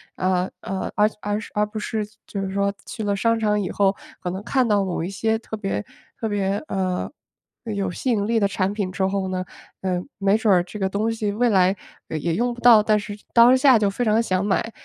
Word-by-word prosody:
呃， 185 0 0
呃， 190 -1 -3
而 210 0 +4
而 205 0 -1 0.2
而 210 0 +2
不 210 +1 -8
是 215 0 -2 0.2
就 200 - -5
是 195 -1 -2
说 200 0 +1
去 230 -3 -6
了 205 -1 0
商 230 +3 +2
场 210 -2 +1
以 185 - -3
后 195 -1 +2 0.3
可 180 - -3
能 185 +2 -4
看 255 +4 +1
到 205 -2 +3
某 180 -3 -2
一 175 - -3
些 220 +3 0
特 220 -1 -7
别 195 - -3 0.3
特 225 - -2
别， 200 +1 -1
呃， 185 -2 -1 0.5
有 200 -4 -2
吸 255 +8 -2
引 205 -3 +1
力 230 0 +2
的 200 - +3
产 195 -1 -1
品 205 -2 -2
之 190 - 0
后 190 0 -1
呢， 185 -1 -2 0.4
呃， 185 -2 -1 0.2
没 200 +1 +3
准 220 -2 +3
儿 175 -1 +4
这 210 +4 -9
个 190 - +1
东 210 +4 -1
西 220 -2 -2
未 240 +3 +2
来 190 -2 +4 0.3
也 160 +2 -2
用 240 +5 0
不 240 - -11
到， 235 -3 +8
但 215 0 +3
是 205 0 -7 0.2
当 240 +2 +7
下 260 -2 +6
就 205 -2 +2
非 240 +5 -2
常 220 +1 +3
想 185 -2 0
买， 220 +3 0
205 Hz, 245 characters per minute, -23 LUFS, 190-220 Hz, 0.5 s, 到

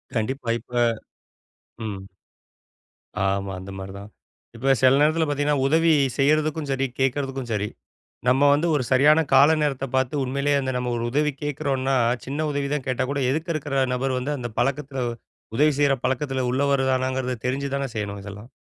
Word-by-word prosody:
கண்டிப்பா, 120 +2 -2
இப்ப, 115 - -24 1.2
ம். 95 0 -8 1.2
ஆமா, 95 0 0
அந்த 95 +1 -9
மாரி 95 0 -7
தான். 100 +1 -10 0.5
இப்ப 135 +3 +2
சில 130 +1 +6
நேரத்துல 150 -2 +2
உதவி 165 +2 +3 0.3
செய்யறதுக்கும் 150 +1 +1
சரி 135 0 0
கேக்குறதுக்கும் 135 -2 -1
சரி 105 0 -1 0.6
நம்ம 135 +3 +4
வந்து 155 +4 +1
ஒரு 135 - +1
சரியான 145 +4 +5
கால 145 +4 +7
நேரத்தப் 135 -3 -2
பாத்து 130 +2 +1
உண்மையிலயே 140 +2 0
அந்த 130 -1 -2
நம்ம 125 -1 -2
ஒரு 115 - -3
உதவி 150 +2 +1
கேட்கிறோன்னா, 135 -2 -1 0.3
சின்ன 145 +4 -2
உதவி 140 -1 -1
தான் 145 -3 -2
கேட்டா 130 -1 0
கூட 140 0 -1
எதுக்கருக்குற 155 -4 -1
நபர் 130 0 -1
வந்து 130 +4 -2
அந்தப் 120 -3 -6
பழக்கத்துல 135 +1 -1 0.6
உதவி 150 0 +4
செய்ற 140 -1 +4
பழக்கத்துல 130 0 -1
உள்ளவருதானாங்கிறத 130 -2 0
தெரிஞ்சு 140 +2 -1
தான் 135 -3 -3
செய்யணும் 100 -1 -4
இதெல்லாம். 105 +4 -10
135 Hz, 150 wpm, -24 LUFS, 125-145 Hz, 1.2 s, கால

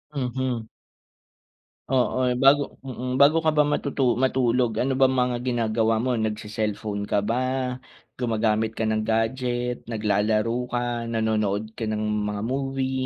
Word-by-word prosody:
Mhm. 125 -3 -2 1.2
Oo, 130 -1 +2 0.3
bago 140 +1 +7 0.5
mm, 130 - -1
bago 150 +3 +6
ka - - +5
ba 150 - +6
matutu 140 -1 -1 0.2
matulog 125 -2 +2
ano 135 +2 0
bang 130 0 +5
mga 125 0 0
ginagawa 115 -2 +1
mo 130 - +1
nagse-cellphone 105 -1 -3
ka - - +3
ba, 120 - +1 0.8
gumagamit 110 -2 0
ka 110 - 0
ng 110 0 +1
gadget, 120 +2 0
naglalaro 105 0 +1 0.2
ka, 120 - 0 0.3
nanonood 110 -2 0
ka 115 - -4
ng 110 0 -1 0.3
mga 105 0 -3
movie? 135 -1 -1
115 Hz, 130 wpm, -25 LUFS, 110-130 Hz, 1.2 s, bago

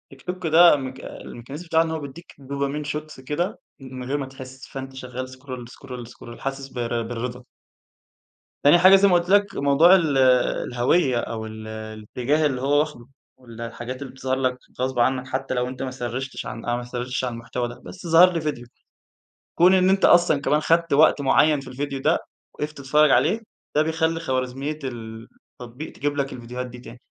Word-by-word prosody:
TikTok 180 +5 -5
ده، 170 +1 +7
م 130 -2 -5
الmechanism 135 +5 -9
بتاعه 165 0 +3
إن 165 - -4
هو 160 - -2
بيدِّيك 145 +4 -10
dopamine 140 +2 -3
shots 155 -3 -7
كده 170 +10 -2 0.2
من 130 -1 -8
غير 140 +3 -1
ما 140 - -3
تحِس، 130 0 -11
فأنتَ 135 0 -7
شغَّال 130 0 -6
scroll 130 -2 -8
,scroll, 125 -3 -9
scroll، 120 -1 -12
حاسس 135 0 -4
بالر 120 -2 -2
بالرضا. 120 +2 -5 1.2
تاني 150 +5 +7
حاجة، 185 +2 +8
زي 200 +1 +5
ما 185 - +3
قُلت 175 +1 +2
لك، 200 0 +3
موضوع 145 +6 +5
ال 155 -7 +2 0.5
الهويَّة 125 +2 +2
أو 110 -1 -4
ال 110 0 -8
الاتجاه 110 +7 -2
اللي 130 -3 0
هو 145 +2 +3
واخده، 150 -6 -3 0.3
وال 115 -2 -12
الحاجات 120 +3 -6
اللي 135 - -6
بتظهر 130 0 -2
لك 130 -1 0 0.2
غصبًا 130 -2 0
عنك، 130 0 0
حتى 135 0 -3
لو 125 0 0
أنتَ 130 0 -7
ما 130 - -3
سرِّيشتِش 130 +1 -5
عن 115 - -7
أو 120 0 0
ما 120 - -5
سرِّيشتِش 125 +1 -4
عن 125 - -2
المحتوى 120 +1 -4
ده، 120 +1 -10
بس 180 -2 -9
ظهر 175 +3 +7
لي 165 - -1
فيديو. 145 -6 -3 0.9
كون 180 +2 +6
إن 185 0 +4
أنتَ 195 0 +3
أصلًا 175 -5 +5
كمان 150 +2 +2
اخدّت 165 0 +2
وقت 150 0 +5
معيَّن 145 +2 +4
في 135 - -11
الفيديو 135 +1 -4
ده، - - +2 0.3
وقِفت 150 +1 -5
تتفرَّج 145 +2 +3
عليه، 215 - +3 0.4
ده 150 - +5
بيخلِّي 160 +1 0
خوارزمية 135 +1 -3
ال 115 -3 -7 0.3
التطبيق 125 +6 -8
تجيب 145 0 -2
لك 140 -1 -1
الفيديوهات 125 +1 -6
دي 125 0 -11
تاني. 120 0 -12
135 Hz, 190 wpm, -23 LUFS, 125-155 Hz, 1.2 s, حاجة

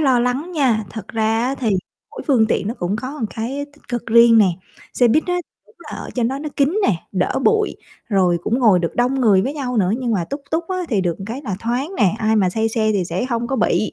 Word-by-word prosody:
lo 265 -5 +3
lắng 255 +8 -1
nha, 255 -9 +1
thật 220 - -8
ra 225 0 0
á 260 +2 0
thì 245 -5 -1 0.4
mỗi - - -8
phương 245 -7 +4
tiện 210 - -1
nó 230 - -3
cũng 175 +4 -1
có 260 +6 -5
một 255 -7 -2
cái 265 +6 -3
tích 295 - -25
cực 240 -1 -4
riêng 235 0 +6
nè, 210 - +6 0.5
xe 245 - +4
buýt 305 +7 +3
á 360 - 0
thì - - -70
đúng 455 - -25
là 335 -3 -9
ở - - -7
trên 240 -2 +1
đó 270 +2 -3
nó 300 - -4
kín 290 +8 +2
nè, 200 -7 +2 0.2
đỡ 185 +5 0
bụi, 435 -1 +2 0.3
rồi 185 -5 +2
cũng 230 +6 0
ngồi 215 -8 +5
được 170 -1 -2
đông 245 +2 +2
người 205 -6 +4
với 270 +7 -3
nhau 255 -4 -3
nữa. 190 -4 +2
Nhưng 245 -3 -1
mà 185 -5 0
tuk 280 - -3
tuk 330 +1 -1
á 375 - -2
thì 215 -6 +1
được 175 -3 -1
một 195 - -7
cái 245 +6 -5
là 210 -9 -3
thoáng 250 +9 -2
nè, 205 -3 +3
ai 220 0 +2
mà 190 -4 +3
say 220 +4 0
xe 220 -1 0
thì 195 -3 0
sẽ 210 - -2
hông 235 -2 -2
có 270 - -2
bị. 215 -3 +1
235 Hz, 270 wpm, -20 LUFS, 215-270 Hz, 0.5 s, riêng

